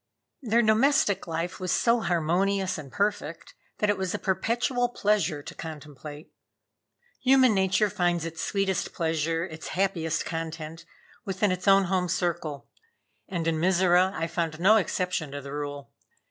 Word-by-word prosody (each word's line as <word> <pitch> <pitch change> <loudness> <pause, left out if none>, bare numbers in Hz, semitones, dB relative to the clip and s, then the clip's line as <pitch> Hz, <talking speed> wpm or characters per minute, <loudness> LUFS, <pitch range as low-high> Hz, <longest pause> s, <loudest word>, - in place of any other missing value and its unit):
Their 235 -2 +2
domestic 220 -3 +3
life 165 +2 -3
was 185 -2 -2
so 235 0 +3
harmonious 185 +1 0
and 140 -4 -10
perfect 205 +1 -2 0.2
that 210 -1 +2
it 200 - -3
was 190 +1 -1
a - - 0
perpetual 240 +6 0
pleasure 195 -10 0
to - - -8
contemplate. 150 -1 -9 0.9
Human 260 -2 +5
nature 190 +2 +2
finds 175 -3 0
its 165 -1 -5
sweetest 195 -2 -1
pleasure, 165 0 0
its 160 -3 -8
happiest 170 -4 0
content, 165 0 -5 0.4
within 195 -1 0
its 180 0 -3
own 195 0 +6
home 185 -1 0
circle; 170 -5 -2 0.6
and 170 -4 -2
in 165 -1 0
Mizora 180 +1 +4
I 165 - -1
found 165 -1 -3
no 205 +5 +6
exception 180 -6 -1
to 145 - -5
the 140 0 -8
rule. 145 -1 -5
180 Hz, 145 wpm, -27 LUFS, 160-200 Hz, 0.9 s, own